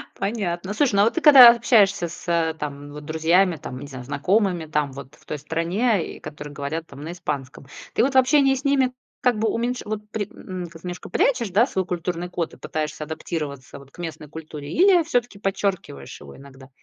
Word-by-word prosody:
понятно. 195 -3 -3
Слушай, 245 -1 +1
ну 200 - +5
вот 225 - +1
ты 335 - 0
когда 270 -6 +10
общаешься 210 -6 +3
с 165 -1 -1
там 145 -1 -6
вот 150 0 -9
друзьями, 165 +3 +2
там, 125 -3 -8
не 140 - -8
знаю, 130 -3 -9
знакомыми 175 - 0
там 150 -3 -1
вот 140 0 -10
в - - -25
той 150 - -4
стране, 170 - -1
и - - -13
которые 145 0 -9
говорят 155 +3 -4
там 140 0 -12
на 160 - -5
испанском, 145 -6 -5 0.3
ты - - +2
вот 270 +2 +1
в - - +6
общении 270 +1 +4
с 265 - -6
ними 270 -3 +2 0.3
как 245 -3 +2
бы 220 0 +1
уменьш 245 +2 -2
вот 210 0 -5
при 205 -3 -3
м 185 -1 -7
немножко 175 +2 -8
прячешь, 235 +4 +1
да, 205 +6 +4
свой 190 -7 -2
культурный 175 0 -3
код 170 -2 -3
и - - -13
пытаешься 155 0 -4
адаптироваться 150 -4 -6
вот 140 0 -17
к - - -21
местной 160 -3 -7
культуре 155 -2 -8
или 365 -1 +5
всё-таки 245 -9 -1
подчеркиваешь 195 - -3
его 70 -1 -12
иногда? 135 -1 -14
175 Hz, 200 wpm, -23 LUFS, 150-220 Hz, 0.3 s, когда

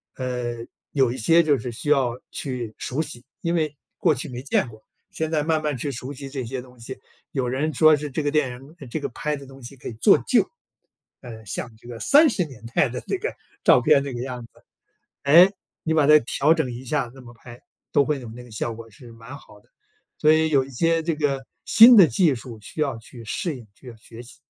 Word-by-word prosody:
呃， 125 -2 -4 0.3
有 135 -4 +2
一 - - -7
些 165 +8 +4
就 145 -5 +2
是 120 +2 -5
需 125 +6 -5
要 130 -4 +2
去 125 -5 -5
熟 135 +5 -2
悉， 130 -6 -9 0.2
因 170 - -1
为 155 -3 -1 0.2
过 160 -4 +3
去 130 - -4
没 125 -1 -6
见 140 - +1
过， 110 -1 -14 0.3
现 160 0 -3
在 155 -2 +1
慢 155 0 +1
慢 150 -3 -2
去 140 +4 -3
熟 130 +2 -7
悉 140 0 -8
这 135 -1 -5
些 130 +2 -5
东 125 -1 -17
西。 125 +3 -8 0.4
有 130 -3 -1
人 140 +5 -1
说 155 +3 +6
是 150 0 -5
这 145 +3 -3
个 145 - 0
电 150 -4 +1
影 135 +6 -12
这 - - -3
个 - - -3
拍 150 +5 -3
的 140 -1 -10
东 135 0 -14
西 120 +3 -10
可 - - -10
以 - - -8
做 110 - +5
旧， - - +3 0.7
呃， 110 -3 -10
像 110 +4 -4
这 120 - -17
个 120 -2 -8
30 285 - +5
年 130 -7 -13
代 - - +3
的 125 - -5
这 - - -1
个 440 +6 -4 0.3
照 - - +6
片， 140 - +4
这 140 -2 -5
个 120 - -5
样 125 -2 -6
子， - - -20 0.7
哎， 170 +7 +7 0.3
你 160 - 0
把 155 -2 +4
它 150 +1 +8
调 140 +6 +2
整 155 -7 -1
一 125 +2 -8
下 135 -2 -1
那 135 - -13
么 120 -1 -13
拍， 120 +1 -14 0.3
都 145 - +4
会 150 -1 -1
有 120 - -9
那 120 +2 -10
个 120 - -16
效 115 +1 -3
果， 115 0 -11
是 115 +2 -14
蛮 115 +5 -11
好 - - -18
的。 - - -32 0.5
所 155 0 +5
以 160 0 +3
有 140 -3 +3
一 135 - -13
些 165 +6 +1
这 165 0 -1
个 140 -3 -2 0.2
新 230 +2 +8
的 190 - +9
技 150 +4 +2
术， 115 -2 -9
需 155 - -8
要 135 -6 -1
去 115 +1 -13
适 155 - -3
应， 120 -3 -13
需 130 - -18
要 120 - -9
学 115 +1 -13
习。 125 - -13
135 Hz, 255 characters per minute, -23 LUFS, 120-150 Hz, 0.7 s, 的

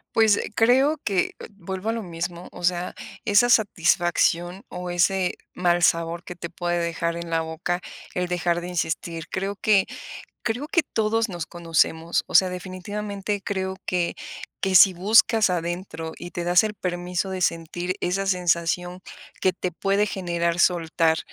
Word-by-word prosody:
Pues, 220 -2 +5
eh, - - -4
creo 265 +7 +4
que, 195 -4 +1 0.3
vuelvo 190 +3 -4
a - - +3
lo 230 -1 -4
mismo, 170 0 -5
o - - -11
sea, 175 0 0 0.3
esa 205 +4 +4
satisfacción 175 -3 +2
o 180 0 -5
ese 180 +1 +2 0.2
mal 175 -1 +2
sabor 170 0 +2
que 180 - -8
te 170 0 -7
puede 175 0 -1
dejar 170 0 -1
en 170 0 -6
la 165 0 +2
boca 160 +2 -3 0.3
el 180 0 -1
dejar 175 -1 0
de 175 - -6
insistir. 165 -1 -3
Creo 195 +1 -2
que 200 -1 +3 0.6
creo 245 +6 -2
que 340 +2 +2
todos 225 -1 0
nos 175 -4 -5
conocemos. 165 -1 0
O - - -11
sea, 190 - +7
definitivamente 200 +3 -4
creo 190 -1 -3
que 175 -2 0 0.5
que 190 -1 0
si 185 0 +8
buscas 215 +4 +4
adentro 175 -2 -3
y 175 0 -8
te 175 - -3
das 175 +4 +4
el 215 -1 -2
permiso 180 0 -3
de 190 -1 -4
sentir 175 +1 -1
esa 195 +2 -1
sensación 180 -1 0 0.4
que 185 - +3
te 180 0 -3
puede 195 +4 +1
generar 170 -3 -1
soltar, 165 -2 +2
180 Hz, 160 wpm, -24 LUFS, 170-195 Hz, 0.6 s, si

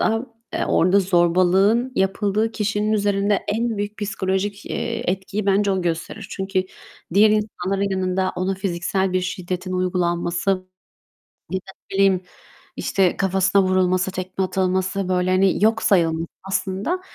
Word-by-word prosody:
an 225 +2 -1 0.2
eee, - - 0
orada 185 +4 +4
zorbalığın 185 +6 +3
yapıldığı 205 +3 +1
kişinin 210 0 0
üzerinde 205 -1 +2
en 225 +2 0
büyük 205 +1 -4
psikolojik, 200 0 -2
eee, 230 -6 -2
etkiyi 195 +2 -4
bence 200 +1 +3
o 190 -1 -1
gösterir. 175 +5 -3
Çünkü 190 -1 -1 0.5
diğer 210 +2 +6
insanların 200 -2 -1
yanında 185 0 0
ona 185 +2 0
fiziksel 190 0 -1
bir 185 - +2
şiddetin 185 0 -4
uygulanması 175 0 0
ya 185 -1 -5 0.7
da, 190 +1 -13 0.2
ne - - -2
bileyim, 195 -2 +4 0.6
işte 190 -3 +1
kafasına 190 +1 +2
vurulması, 185 0 +2
tekme 185 +1 -3
atılması, 190 +1 -1
böyle, 180 0 +1
hani, 190 +2 +3
yok 220 0 +3
sayılması 165 -4 +2 0.2
aslında, 195 - -2
190 Hz, 135 wpm, -22 LUFS, 185-205 Hz, 0.7 s, diğer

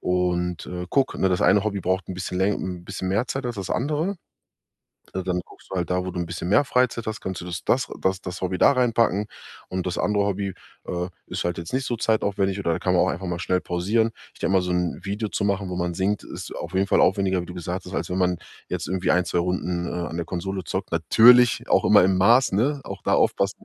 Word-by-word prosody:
und, 90 -2 0
äh, 90 0 -5
gucke 135 -2 +1
ne, 95 - +4
das 90 - +1
eine 105 +1 +4
Hobby 100 -2 -1
braucht 95 0 -1
'n 95 - -4
bisschen 90 0 -4
läng 100 +2 +2
'n 90 -1 -5
bisschen 95 - -4
mehr 105 +6 +1
Zeit 135 +1 -3
als 120 - -3
das 95 -2 -5
andere.“ 155 +9 -1 1.0
Äh, 95 - -2
dann 90 -1 -1
guckst - - -18
du - - -3
halt 85 -3 -1
da, 90 0 0
wo 95 - -3
du 90 - -4
'n 85 - -2
bisschen 85 0 -5
mehr 105 +9 +5
Freizeit 125 -3 +1
hast, 110 -3 -4
kannst 95 -1 -4
du - - -7
das 85 -3 -5
das 130 - +2
das 95 0 0
das 90 0 -6
Hobby 95 0 -1
da - - +6
reinpacken. 115 -5 +2 0.4
Und 90 -1 -3
das 90 - -3
andere 105 -1 +1
Hobby, 100 -1 -2 0.3
äh, 90 0 -2 0.2
ist - - -3
halt 85 0 -1
jetzt 85 +4 -7
nicht 130 0 0
so 120 - -1
zeitaufwendig, 100 -3 0
oder 85 -4 0
da - - -2
kann 90 - 0
man 90 - +4
auch - - +1
einfach 95 +1 -4
mal 85 -1 -3
schnell 90 +2 0
pausieren. 105 +6 +1 0.2
Ich - - -19
denke 95 - 0
mal 95 - +4
so 90 - -3
'n 90 -1 -1
Video 105 +2 -2
zu - - -2
machen, 100 -1 -1
wo 90 - -4
man 85 -1 -2
singt, 100 +3 0
ist - - -8
auf 85 - -6
jeden 95 +1 +3
Fall - - +4
aufwendiger, 95 -1 +2
wie - - -7
du 90 - -8
gesagt 90 +2 -4
hast, 90 - -6
als - - -2
wenn 90 - -1
man 90 -1 +2 0.3
jetzt - - -3
irgendwie 95 -1 -1
1, 90 0 +2
2 85 - 0
Runden, 90 0 -1
äh, 85 0 -3
an 80 - -5
der 85 - -2
Konsole 95 +2 -4
zockt. 95 +1 -4
Natürlich 115 +9 +6
auch - - +4
immer - - +7
im 95 +1 +3
Maß, 120 +8 +5
ne? 135 +8 +1
Auch - - -7
da - - +1
aufpassen, - - +1
95 Hz, 260 wpm, -24 LUFS, 90-105 Hz, 1.0 s, immer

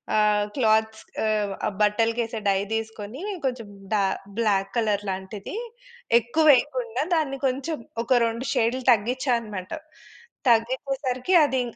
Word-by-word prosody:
ఆహ్, 210 -1 +3
క్లాత్స్ 220 -3 +2 0.2
ఆహ్, 210 -2 0 0.3
బట్టలకేసే 225 +2 +1
డై 195 - +3
తీసుకొని 225 +3 -5 0.2
కొంచెం 245 -5 -2 0.3
డా 205 - +3 0.4
బ్లాక్ 195 -3 +1
కలర్ 210 -3 +1
లాంటిది 190 - -6 0.6
ఎక్కువ 240 +8 0
వేయకుండా 465 - +1
దాన్ని 280 -4 0
కొంచెం, 275 +5 -2 0.3
ఒక 245 +1 +3
2 230 +3 -3
షేడ్లు 240 +3 +1
తగ్గించానమాట. 235 -4 0 0.8
తగ్గిచేసరికి 255 +5 0
అది 265 -3 +1
230 Hz, 105 wpm, -25 LUFS, 210-260 Hz, 0.8 s, ఆహ్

